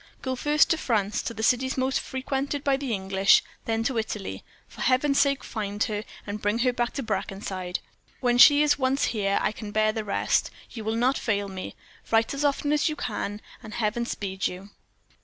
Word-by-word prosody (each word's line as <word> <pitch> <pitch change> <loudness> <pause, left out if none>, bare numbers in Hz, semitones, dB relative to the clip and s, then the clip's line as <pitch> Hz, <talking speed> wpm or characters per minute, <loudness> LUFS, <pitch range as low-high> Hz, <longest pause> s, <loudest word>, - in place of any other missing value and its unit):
Go 260 -1 -1
first 295 +3 +3
to 325 - +2
France 210 -6 0
to - - -4
the 220 - -4
cities 260 +3 +2
most 260 +1 +1
frequented 275 +2 -3
by 275 -1 +3
the 270 -2 -4
English 195 0 +3 0.2
then 225 0 0
to 240 -1 0
Italy. 215 -2 -5 0.2
For - - -11
Heaven's 275 +2 +3
sake, 275 -1 +2
find 205 -1 -3
her, 210 -1 -2 0.2
and 205 +1 -5
bring 205 +2 +1
her 250 - +3
back 240 -1 -1
to 275 - -3
Brackenside. 190 -3 -3 0.4
When 245 -1 +2
she 290 +3 +9
is 295 -1 +2
once 265 +1 +1
here 200 -2 +1
I - - +2
can 215 0 -8
bear 215 +1 +2
the 220 0 -3
rest. 200 - +1 0.2
You 225 - -7
will 220 +1 0
not 250 +4 +2
fail 205 -3 0
me. 190 -1 -7 0.3
Write 225 +2 +2
as 280 +1 -2
often 290 +1 +1
as 300 +2 +2
you 305 - -3
can; 210 -5 -4 0.2
and 215 -1 -9
Heaven 235 +1 -1
speed 190 -4 -2
you." 190 +3 -8
225 Hz, 200 wpm, -26 LUFS, 205-265 Hz, 0.4 s, she